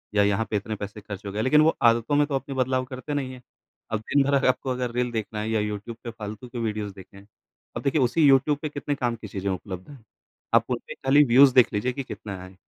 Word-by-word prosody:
या 105 Hz, -, +5 dB
यहाँ 105 Hz, +2 st, +1 dB
पे -, -, -2 dB
इतने 110 Hz, +2 st, -4 dB
पैसे 105 Hz, +1 st, -7 dB
खर्च 100 Hz, 0 st, -8 dB
हो 100 Hz, -, -4 dB
गए। 105 Hz, +2 st, -2 dB
लेकिन 150 Hz, +5 st, +5 dB
वो 160 Hz, +1 st, +4 dB
आदतों 115 Hz, +5 st, +1 dB
में 145 Hz, 0 st, +4 dB
तो 145 Hz, -, -2 dB
अपनी 135 Hz, +1 st, -4 dB
बदलाव 130 Hz, 0 st, 0 dB
करते 130 Hz, +3 st, -6 dB
नहीं 135 Hz, -3 st, -2 dB
है, 125 Hz, -, -12 dB, 0.5 s
अब 110 Hz, -, 0 dB
दिन 140 Hz, +6 st, +2 dB
भर 140 Hz, +1 st, 0 dB
अगर 140 Hz, -1 st, +3 dB
आपको 130 Hz, +1 st, +1 dB
अगर 125 Hz, -1 st, -2 dB
रील 125 Hz, 0 st, -1 dB
देखना 110 Hz, -1 st, -4 dB
है 110 Hz, -, -3 dB
या 110 Hz, -1 st, +1 dB
यूट्यूब 105 Hz, +2 st, -4 dB
पे 120 Hz, -, -5 dB
फालतू 110 Hz, +1 st, -8 dB
के 120 Hz, -, -9 dB
वीडियोज़ 105 Hz, -3 st, -3 dB
देखें। 95 Hz, +1 st, -14 dB, 0.5 s
अब -, -, -3 dB
देखिए, 140 Hz, +1 st, +2 dB
उसी 125 Hz, +6 st, +2 dB
यूट्यूब 140 Hz, +2 st, +4 dB
पे 155 Hz, -, -3 dB
कितने 145 Hz, 0 st, -3 dB
काम 120 Hz, -3 st, -1 dB
की 110 Hz, -1 st, -9 dB
चीजें 100 Hz, 0 st, -4 dB
उपलब्ध 95 Hz, +1 st, -5 dB
हैं। 135 Hz, -6 st, -13 dB, 0.5 s
आप -, -, +5 dB
उन -, -, 0 dB
पे -, -, -6 dB
खाली 140 Hz, +2 st, +4 dB
व्यूज़ 130 Hz, +1 st, +6 dB
देख 125 Hz, -2 st, +5 dB
लीजिए 105 Hz, +5 st, 0 dB
कि 140 Hz, -, -4 dB
कितना 100 Hz, -6 st, -7 dB
आएँ। 95 Hz, +1 st, -12 dB
120 Hz, 260 wpm, -25 LUFS, 105-135 Hz, 0.5 s, व्यूज़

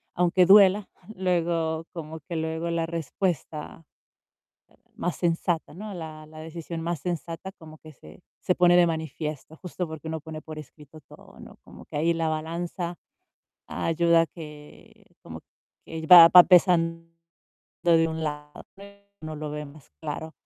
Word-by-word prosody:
Aunque 180 Hz, +1 st, +3 dB
duela, 200 Hz, +1 st, +6 dB, 0.3 s
luego 170 Hz, -3 st, -1 dB
como 160 Hz, -1 st, -7 dB
que 170 Hz, -, -4 dB
luego 160 Hz, +1 st, -3 dB
la 165 Hz, -1 st, -1 dB
respuesta 165 Hz, -1 st, -4 dB, 1.1 s
más 175 Hz, -, -3 dB
sensata, 170 Hz, -2 st, -1 dB
¿no? 205 Hz, +4 st, -8 dB
La 155 Hz, -3 st, -8 dB
la 155 Hz, 0 st, -13 dB
decisión 165 Hz, +1 st, -7 dB
más 170 Hz, -1 st, -3 dB
sensata 175 Hz, +1 st, -5 dB
como 155 Hz, -2 st, -13 dB
que 155 Hz, -, -13 dB
se 80 Hz, -, -16 dB, 0.2 s
se 180 Hz, -, +1 dB
pone 175 Hz, 0 st, +5 dB
de 175 Hz, -1 st, +5 dB
manifiesto 160 Hz, -1 st, -5 dB
justo 180 Hz, 0 st, -5 dB
porque 160 Hz, 0 st, -9 dB
uno 160 Hz, -1 st, -4 dB
pone 155 Hz, 0 st, -8 dB
por 155 Hz, -1 st, -10 dB
escrito 150 Hz, +1 st, -14 dB
todo, -, -, -16 dB
¿no? -, -, -13 dB
Como -, -, -14 dB
que -, -, -6 dB
ahí 165 Hz, +3 st, +2 dB
la 165 Hz, -1 st, -1 dB
balanza 170 Hz, +2 st, -4 dB, 0.7 s
ayuda 170 Hz, 0 st, +2 dB
a -, -, -1 dB
que 150 Hz, -2 st, -14 dB
como -, -, -10 dB, 0.5 s
que 160 Hz, 0 st, -6 dB
va 170 Hz, -1 st, +11 dB
va 180 Hz, -, +10 dB
pesando 165 Hz, -2 st, +3 dB, 0.7 s
de 165 Hz, -1 st, +4 dB
un 160 Hz, 0 st, -4 dB
lado, 150 Hz, -1 st, -6 dB, 0.6 s
uno 155 Hz, 0 st, -6 dB
lo 150 Hz, 0 st, -5 dB
ve 150 Hz, 0 st, -5 dB
más 140 Hz, -, -16 dB
claro. 160 Hz, 0 st, -6 dB
165 Hz, 155 wpm, -25 LUFS, 155-175 Hz, 1.1 s, va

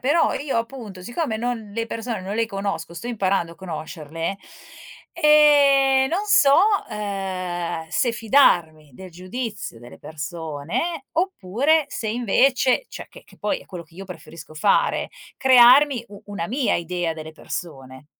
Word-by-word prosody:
però 290 Hz, +6 st, +2 dB
io 275 Hz, -4 st, -2 dB
appunto 230 Hz, -6 st, -7 dB
siccome 240 Hz, -, -3 dB
non 230 Hz, -2 st, -4 dB
le 230 Hz, +2 st, -3 dB
persone 230 Hz, -1 st, -4 dB
non 190 Hz, +2 st, -5 dB
le 230 Hz, +1 st, 0 dB
conosco, 195 Hz, -5 st, -4 dB
sto 170 Hz, -, -7 dB
imparando 195 Hz, -7 st, -1 dB
a -, -, -15 dB
conoscerle, 165 Hz, 0 st, -6 dB, 0.8 s
e 285 Hz, -4 st, +5 dB
non 385 Hz, +5 st, -1 dB
so, 285 Hz, -9 st, +5 dB, 0.3 s
uhm, 185 Hz, -5 st, -4 dB
se 235 Hz, +8 st, +1 dB
fidarmi 175 Hz, -, +2 dB
del 185 Hz, +5 st, -11 dB
giudizio 195 Hz, -, -6 dB
delle 120 Hz, +1 st, -13 dB
persone 165 Hz, -, -5 dB
oppure 315 Hz, -, +1 dB
se 245 Hz, -6 st, -4 dB
invece 250 Hz, -, +2 dB
cioè, -, -, -9 dB
che -, -, -15 dB
che -, -, -20 dB
poi 210 Hz, -, -1 dB
è -, -, -17 dB
quello 175 Hz, -3 st, -8 dB
che 165 Hz, +1 st, -25 dB
io 195 Hz, -, -8 dB
preferisco 165 Hz, -3 st, -11 dB
fare, 195 Hz, +6 st, +1 dB, 0.3 s
crearmi 260 Hz, 0 st, +6 dB
u 200 Hz, -1 st, -13 dB
una 200 Hz, -5 st, -4 dB
mia 260 Hz, +2 st, 0 dB
idea 170 Hz, 0 st, -2 dB
delle 160 Hz, 0 st, -8 dB
persone. 135 Hz, -5 st, -8 dB
205 Hz, 145 wpm, -22 LUFS, 170-260 Hz, 0.8 s, crearmi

